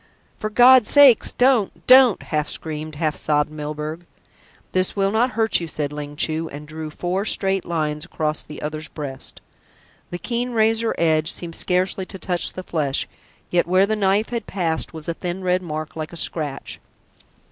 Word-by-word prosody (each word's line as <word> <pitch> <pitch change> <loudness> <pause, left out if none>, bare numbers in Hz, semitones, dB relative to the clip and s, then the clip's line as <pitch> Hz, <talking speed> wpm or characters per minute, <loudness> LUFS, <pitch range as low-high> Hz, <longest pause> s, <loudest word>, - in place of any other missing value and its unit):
"For 215 - -4
God's 245 +1 +6
sake 280 -5 +7
don't, 245 -5 +2
don't," 255 -4 +6
half 150 -1 -2
screamed, 155 -1 -5
half 155 0 -1
sobbed 150 0 +1
Milburgh. 150 +2 -5 0.7
"This 185 0 +1
will 195 -1 +1
not 230 +3 +1
hurt 225 0 +2
you," 170 - -5
said 150 -2 -4
Ling 145 0 -6
Chu, 160 +2 -1
and 150 +1 -9
drew 155 0 -6
four 180 +5 -2
straight 195 -3 0
lines 155 -2 -2
across 155 -3 -2
the 150 - -10
other's 155 +1 -4
breast. 140 -4 -8 0.7
The 175 - -4
keen 245 +5 -3
razor 225 0 +2
edge 160 -1 +2
seemed 170 -2 -2
scarcely 185 +1 0
to 195 - -7
touch 180 -2 -1
the 185 - -7
flesh, 150 -6 -1 0.4
yet 175 -1 +2
where 185 +2 +4
the 215 +2 -1
knife 205 +1 +1
had 235 -3 -4
passed 165 -4 -2
was 160 -2 -8
a 170 - -1
thin 180 +2 -5
red 180 0 +1
mark 155 -3 -6
like 155 -1 -5
a - - -7
scratch. 150 -4 -3
175 Hz, 175 wpm, -22 LUFS, 155-200 Hz, 0.7 s, sake